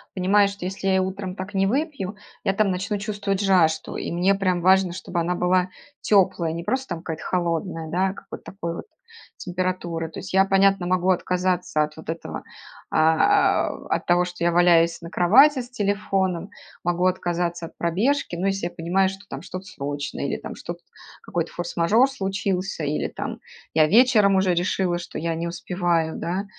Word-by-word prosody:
понимаю, 200 +2 +4
что 200 -1 -7
если 195 +1 -4
я 190 - +3
и - - +3
утром 190 0 -3
так 190 +2 -7
не 195 0 +2
выпью, 270 - -2 0.3
я, 195 - +2
там, 200 -1 +2
начну 200 +3 -2
чувствовать 205 -1 -2
жажду. 180 -5 +2
И - - -4
мне 180 +3 +2
прям 185 -3 0
важно, 190 -1 +4
чтобы 175 -1 -4
она 175 +2 0
была 180 +1 +2 0.3
тёплая, 175 -5 +2
не 170 - -5
просто 265 +7 -1
там 165 - -9
какая-то 160 -2 -5
холодная, 170 -2 -2
да, 185 +4 +1
а - - -5
какой-то - - -10
такой 170 -4 -4
вот - - -7 0.5
температуры. 175 -2 -3
То - - -8
есть - - -8
я, 190 0 +6
понятно, 195 -1 +3
могу 185 0 +1
отказаться 180 -3 0
от 150 0 -5
вот 160 - -11
этого, 80 - -5 0.5
а 160 0 +3
э - - -9
от - - -1
того, 175 0 +3
что 175 -1 -6
я 175 - +3
валяюсь 170 -1 +4
на 170 - -8
кровати 260 +12 +5
с 245 - -10
телефоном, 195 -5 -1 0.3
могу 175 +1 0
отказаться 175 -2 -1
от - - -19
пробежки, 200 - 0
ну, 185 +3 -1
если 195 -2 -1
я - - -8
понимаю, 185 +3 +1
что 195 +1 -10
там 135 +1 -6
что-то 185 +1 -8
срочное 145 -5 -5
или, - - -2
там, - - -8
что-т 175 0 -7 0.4
какой-то 170 -1 -3
форс-мажор 175 +9 +2
случился, 195 - -2
или, 145 +1 -1
там, - - -6 0.3
я 155 -1 +5
вечером 215 -2 +5
уже 190 -1 +3
решила, 175 0 0
что - - -8
я 165 0 -2
не 170 +1 -3
успеваю, 170 -2 -1
да. 185 +4 -2
180 Hz, 185 wpm, -24 LUFS, 170-195 Hz, 0.5 s, я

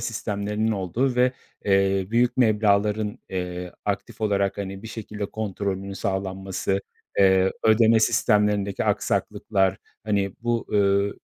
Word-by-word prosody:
sistemlerinin 105 -1 -2
olduğu 110 +7 0
ve, 125 +1 +4 0.3
eee, 95 -1 +2
büyük 120 +1 +2
meblağların, 105 -2 +2
eee, 90 -1 -4
aktif - - -3
olarak, 100 -2 0
hani, 95 0 -5
bir 115 - -7
şekilde 105 -2 -5
kontrolünün 100 -2 -4
sağlanması, 95 0 -2 0.4
eee, 95 -1 +4
ödeme 110 0 +5
sistemlerindeki 105 -3 +2
aksaklıklar, 95 -1 0 0.3
hani, 100 -3 0
bu, 120 -1 -1
ööö, 100 0 +2
100 Hz, 110 wpm, -24 LUFS, 95-110 Hz, 0.4 s, ödeme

